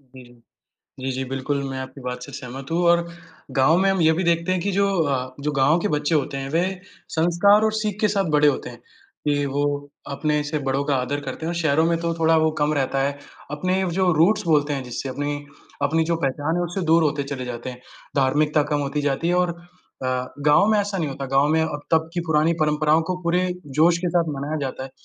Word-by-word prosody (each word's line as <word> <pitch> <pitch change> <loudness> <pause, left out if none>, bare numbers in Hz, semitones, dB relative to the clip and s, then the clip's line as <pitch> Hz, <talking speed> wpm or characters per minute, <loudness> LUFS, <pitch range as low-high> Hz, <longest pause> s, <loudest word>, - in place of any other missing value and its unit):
जी, 130 - -11
जी। 120 -1 -19 0.6
जी, 130 +1 -2
जी, 130 +1 -3
बिल्कुल 135 +2 -2
मैं 135 - -5
आपकी 130 +1 -8
बात 125 0 -5
से 140 - -10
सहमत 135 +1 -8
हूँ 170 +2 +1
और 170 0 +3 0.5
गाँव 150 +6 +5
में 195 +1 +3
हम 190 -2 +1
ये 160 0 +5
भी 175 +4 -1
देखते 170 +1 +1
हैं 185 -1 0
कि 200 +3 -1
जो 200 +1 +2 0.2
अ, 130 -3 -2
जो 150 +2 -2
गाँव 145 +4 +3
के 190 - 0
बच्चे 150 +2 0
होते 140 -2 -1
हैं, 135 0 -4
वे 165 +4 +1 0.5
संस्कार 175 +6 +4
और 220 - +1
सीख 215 -2 -2
के 215 - +4
साथ 195 -4 0
बड़े 150 0 +5
होते 145 - 0
हैं, 120 -1 -12 0.5
कि 145 -1 +1
वो 140 +1 -1 0.5
अपने 150 +2 0
से 150 +1 -2
बड़ों 135 +1 0
का 145 - +1
आदर 130 +3 -1
करते 140 +3 -6
हैं 165 - -1
और - - -6
शहरों 160 -1 +2
में 170 0 +2
तो 170 0 -1
थोड़ा 165 0 +4
वो 160 0 +3
कम 150 +1 +2
रहता 135 -1 0
है। 140 0 -4 0.3
अपने 185 +5 0
व 185 - -1
जो 185 +1 +2
रूट्स 165 +7 +3
बोलते 150 -2 +3
हैं 135 -2 -3
जिससे 125 +2 -5
अपनी, 145 +2 -2 0.5
अपनी 160 +3 +2
जो 170 +1 0
पहचान 145 +4 0
है, 175 - 0
उससे 175 +3 -3
दूर 165 +1 +4
होते 145 -2 0
चले 130 -2 -5
जाते 120 0 -5
हैं। 125 0 -10 0.3
धार्मिकता 150 +2 +2
कम 145 - +1
होती 140 +1 -2
जाती 145 +3 -1
है 175 - +2
और 180 -1 +1 0.5
अ, - - -1 0.4
गाँव 150 +7 +5
में 215 -1 +3
ऐसा 200 -1 -2
नहीं 165 -4 -1
होता। 135 0 -5
गाँव 135 +1 +4
में 160 +1 +3
अब 150 -2 -2
तब 160 0 +2
की 175 - -1
पुरानी 160 +1 +3
परंपराओं 155 +1 +3
को 185 - 0
पूरे 170 +2 +2 0.4
जोश 165 +2 +5
के - - +1
साथ 170 0 +2
मनाया 145 +3 -3
जाता 130 -1 -4
है 135 - -8
150 Hz, 240 wpm, -23 LUFS, 135-170 Hz, 0.6 s, गाँव